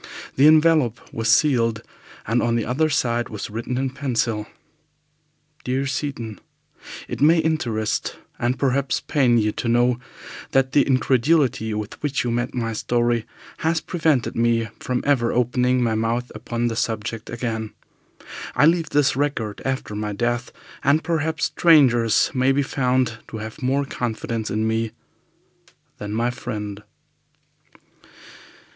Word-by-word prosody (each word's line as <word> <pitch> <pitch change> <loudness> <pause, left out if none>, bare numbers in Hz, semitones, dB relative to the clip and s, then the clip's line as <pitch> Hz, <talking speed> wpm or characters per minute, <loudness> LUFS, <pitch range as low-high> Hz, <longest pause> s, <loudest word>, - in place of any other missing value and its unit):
The 140 +3 +6
envelope 155 -6 +4
was 115 +1 -1
sealed, 115 -4 +3 0.4
and 115 +3 +1
on 115 0 +1
the 115 - 0
other 150 +6 +1
side 120 -4 0
was 105 -1 -6
written 115 +3 -3
in 135 0 -1
pencil 120 -6 -1 1.2
DEAR 130 +2 -1
SEATON, 135 -6 -4 0.7
"It - - -6
may 160 +4 +6
interest, 120 -10 -1 0.2
and 120 +1 0
perhaps 140 0 +1
pain 130 -6 +2
you, 105 -1 +2
to 115 - -4
know 120 +1 +3 0.5
that 135 0 +3
the 145 - +5
incredulity 130 -2 +2
with 105 0 -6
which 145 -2 -1
you 120 - -1
met 120 +2 -2
my 115 -2 -2
story 120 0 0 0.3
has 160 0 +1
prevented 155 -9 0
me 115 -1 +1
from 125 -1 -2
ever 130 -5 +2
opening 125 +1 +2
my 115 -2 +1
mouth 115 +3 -1
upon 120 +2 -3
the 115 - -2
subject 110 0 -3
again. 115 -2 -3 0.9
I - - +5
leave 165 -1 +3
this 140 -2 +2
record 130 -7 -2
after 130 -5 -2
my 105 0 -3
death, 120 +3 -1 0.3
and 145 +4 +3
perhaps 160 -1 0
strangers 125 -9 +4
may 130 +1 +3
be 140 +1 +2
found 125 -4 0
to 110 - -7
have 110 +6 -8
more 135 +2 +1
confidence 115 -3 -3
in 110 +1 0
me 110 0 -1 1.1
than 105 0 -5
my 115 +3 0
friend." 105 -4 -6
120 Hz, 140 wpm, -22 LUFS, 115-140 Hz, 1.2 s, The